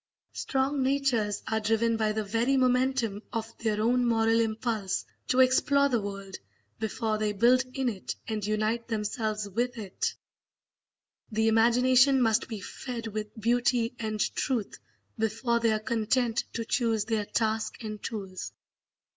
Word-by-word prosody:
Strong 270 +1 0
natures 260 -6 +1
are 220 0 0
driven 225 +1 +1
by 220 -1 +1
the 215 0 -1
Very 230 +6 +1
momentum 255 -4 +1
of 225 -1 -4
their 215 -2 0
own 245 +3 +2
moral 225 -1 +3
impulse 220 -3 -1 0.2
to 260 0 +4
explore 280 +2 +4
the 240 -4 +1
world 195 -1 -6 0.4
before 220 0 -1
they 210 -1 0
build 245 +5 +4
in 265 -2 0
it 205 -6 -3
and 215 -2 -3
unite 215 +3 -1
themselves 215 -1 -2
with 240 +5 -2
it; 200 -4 -3 1.2
the 220 +1 +1
imagination 250 +4 +5
must 225 -1 +2
be 220 -4 -5
fed 235 +4 -6
with 215 0 -5
beauty 240 +1 +1
and 215 -2 -3
truth 245 -7 -2 0.4
before 230 +2 +1
they 230 -1 +2
are 215 - +2
content 230 +2 0
to 230 - -3
choose 225 -3 +1
their 220 -2 -1
task 220 +1 -1
and 215 -1 -6
tools. 190 -4 -6
225 Hz, 145 wpm, -28 LUFS, 215-245 Hz, 1.2 s, imagination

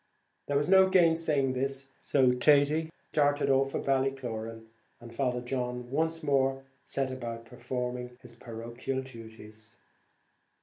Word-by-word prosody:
There 145 - +1
was 145 +1 0
no 190 0 +6
gainsaying 165 -7 +3
this, 135 +1 -2
so 130 -3 +3
Thady 145 +4 +3 0.2
started 145 -1 +2
off 135 0 +3
for - - -3
Ballycloran, 125 -5 -2 0.3
and 120 -1 -12
Father 125 -1 -1
John 125 -1 -4
once 160 +3 -1
more 135 -2 +1 0.2
set 135 -1 -2
about 115 -3 -6
performing 125 0 -5
his 120 - -13
parochial 120 +3 -5
duties. 110 -3 -13
130 Hz, 125 wpm, -29 LUFS, 120-140 Hz, 0.3 s, no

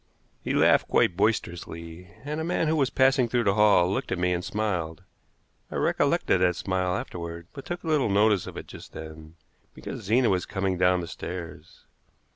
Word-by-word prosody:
He - - -1
laughed - - +4
quite 90 - +2
boisterously, 85 -4 -2 0.2
and 150 +2 -3
a - - -2
man 165 -1 0
who 160 - +2
was 135 -4 +2
passing 130 -2 +3
through 120 0 +1
the 100 -3 +2
hall 105 -4 +5
looked 95 - -2
at 95 - 0
me 90 +1 +1
and 90 0 -2
smiled. 95 -6 -3 0.7
I - - -7
recollected 95 - +1
that 90 -1 +3
smile 95 0 -1
afterward, 85 -1 -6
but 135 - -9
took 175 0 -5
little 155 -8 +1
notice 105 -1 +3
of - - -8
it - - -6
just - - -12
then, 80 0 -10 0.4
because - - -7
Zena 115 +4 +2
was 90 -1 0
coming 95 -2 -1
down 90 0 +3
the 85 - -6
stairs. 85 -3 -8
95 Hz, 185 wpm, -26 LUFS, 85-115 Hz, 0.7 s, hall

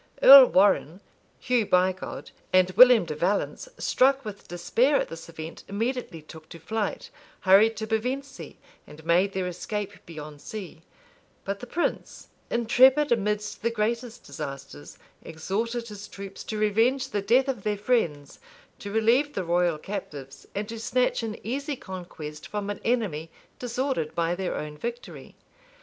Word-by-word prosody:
Earl 270 -1 +11
Warrenne, 185 -3 +3 0.4
Hugh 245 -4 +1
Bigod, 185 +1 0 0.2
and 185 0 +4
William 245 -1 +7
de 155 - -4
Valence, 185 - -1
struck 270 0 +2
with 205 -1 -8
despair 230 +11 +1
at - - +1
this 165 0 -9
event, 160 0 -9
immediately 220 - -3
took 155 0 -13
to 165 - -11
flight, 210 +6 -3 0.3
hurried 210 +4 +5
to 220 - -3
Pevencey, 255 +5 -4 0.3
and 155 +1 -14
made 180 +4 +2
their 190 -1 -2
escape 200 +3 -5
beyond 150 -3 -9
sea:[] 190 -7 -8 0.6
but 200 0 -3
the 245 - -9
prince, 345 - -3 0.2
intrepid 260 +5 +4
amidst 210 -2 -1
the 235 - +1
greatest 230 +1 -3
disasters, 140 - -8 0.2
exhorted 225 +9 -3
his 205 -1 -9
troops 195 0 -9
to 215 - -4
revenge 230 +6 +1
the 205 - -1
death 245 +7 +3
of 255 -6 -2
their 210 +1 -1
friends, 170 - -1 0.4
to 200 - -7
relieve 235 +7 +2
the 190 - -1
royal 175 -1 +1
captives, 145 -7 -8
and 205 +1 -3
to 230 0 -6
snatch 250 +3 0
an 220 -2 -4
easy 280 +5 -3
conquest 175 - -9
from 205 -1 -4
an 205 - -7
enemy 200 -10 -1 0.3
disordered 250 - -2
by 170 0 0
their 185 0 -3
own 150 0 -6
victory. 240 +1 -7
205 Hz, 150 wpm, -26 LUFS, 175-235 Hz, 0.6 s, Earl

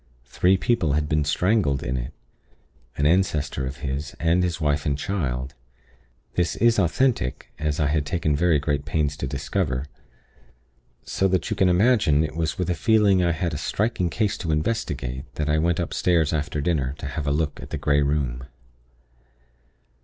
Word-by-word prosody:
Three 90 +9 +2
people 90 -7 +1
had 75 0 0
been 75 0 +1
strangled 75 -1 +1
in 65 - -2
it 65 +2 -4 0.9
an 70 - +1
ancestor 75 -6 +1
of 65 +2 -6
his 70 +3 -4
and 85 +2 +2
his 90 -1 -1
wife 75 -2 +1
and 70 -1 0
child. 70 -7 -3 0.8
This 90 -1 0
is 115 -1 +3
authentic, 100 - 0
as 75 0 -1
I 75 - +2
had 75 +1 +1
taken 75 0 0
very 85 +1 +3
great 70 0 -1
pains 75 -1 -1
to 70 - -3
discover; 70 0 -2 1.2
so 95 - 0
that 95 +4 -1
you - - +1
can 95 -2 +3
imagine 90 - +3
it 80 - -4
was 80 -1 -1
with 90 -1 -1
a - - +2
feeling 100 -2 +3
I 85 - +2
had 85 0 -2
a 75 - -3
striking 100 +2 -1
case 105 +2 -1
to 80 - -2
investigate 75 - -2
that 75 -1 -2
I 75 +1 +2
went 85 +2 +1
upstairs 85 -2 +1
after 75 -1 -2
dinner 70 -4 0
to - - -8
have 75 +1 -4
a - - +2
look 75 0 -1
at - - -9
the - - -3
Grey 75 0 +2
Room. 70 -4 -1
75 Hz, 175 wpm, -24 LUFS, 70-90 Hz, 1.2 s, is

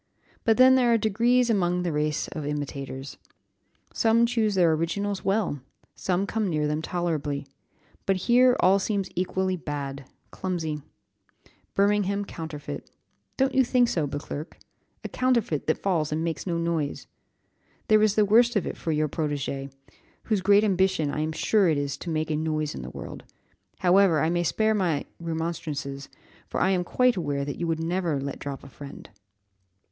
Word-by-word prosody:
But 225 -1 +4
then 255 +1 +8
there 250 -2 +4
are 230 - +5
degrees 235 +3 +2
among 180 -3 +1
the 175 - -1
race 150 0 -1
of 155 - -5
imitators. 140 -2 -5 0.8
Some 230 +1 +4
choose 225 -4 +1
their 175 -3 +4
originals 190 +5 -1
well, 195 -7 0 0.3
some 185 +1 -1
come 215 -1 -1
near 150 -3 0
them 150 +1 -1
tolerably; 155 -5 -2 0.6
but 195 - +3
here, 250 +1 +5
all 190 +2 +5
seems 200 -1 -2
equally 185 +1 0
bad, 140 -3 -5 0.3
clumsy, 165 -5 -3 0.9
Birmingham 200 0 +2
counterfeit; 160 -5 -7 0.5
don't 265 0 +2
you 265 0 +5
think 245 0 +3
so, 155 -4 0
Beauclerc? 145 +2 -6 0.5
a - - -3
counterfeit 235 - 0
that 155 - +2
falls 165 -6 0
and 155 +1 -1
makes 165 +2 -3
no 170 -2 0
noise. 165 -4 -2 0.8
There 215 -1 +5
is 215 -1 +3
the 215 - +4
worst 235 +3 +4
of 205 - +1
it - - -5
for 165 - -2
your 155 0 +1
protégé, 140 -2 -3 0.5
whose 215 -4 0
great 200 +2 +5
ambition 190 -6 +2
I - - -3
am 155 +1 -1
sure 190 +4 +2
it 155 - +2
is 140 -1 -2
to 175 - -7
make 155 -1 -1
a - - +1
noise 155 -1 -1
in - - -6
the 65 - -7
world. - - -8 0.6
However, 180 -2 +5
I 160 +2 +1
may 175 0 +1
spare 220 +5 +1
my 175 -8 0
remonstrances, 160 -4 -4 0.4
for - - -3
I 190 - +3
am 180 -2 +1
quite 250 +5 +2
aware 145 -5 -1
that 145 - -5
you 170 - -1
would 165 -1 0
never 170 -3 0
let 140 0 -5
drop 140 -1 -6
a - - -11
friend." 140 +1 -11
170 Hz, 170 wpm, -26 LUFS, 150-205 Hz, 0.9 s, then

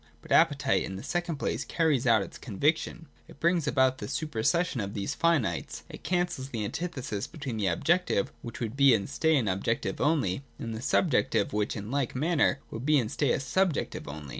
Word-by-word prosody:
But - - -14
appetite 140 -4 +4
in 95 - -4
the 95 - -7
second 175 -2 -2
place 140 - -2
carries 150 -7 +1
out 110 -4 +5
its - - -10
conviction. 150 - -1 0.2
It - - -15
brings 170 -2 +2
about 130 -2 +2
the 105 - -5
supersession 155 +2 0
of 100 0 -5
these 100 -2 -2
finites: 140 - 0
it - - -10
cancels 175 -7 -1
the 110 -5 -3
antithesis 130 - -4
between 140 -8 -5
the 100 -3 0
objective 165 - +1
which 120 -1 -8
would 115 0 -3
be 140 -3 +6
and 100 -3 -2
stay 160 -1 +2
an 120 -6 0
ob 95 0 -1
jective 115 - -1
only, 140 - +1 0.2
and 115 -1 -5
the 110 - -5
subjective 135 - +1
which 105 0 0
in 105 +1 -6
like 140 -3 -1
manner 155 +2 +2
would 115 - -5
be 150 +2 +4
and 115 -5 0
stay 145 -4 +1
a - - +1
subjective 165 +5 -1
only. 75 0 -7
130 Hz, 200 wpm, -28 LUFS, 110-160 Hz, 0.2 s, be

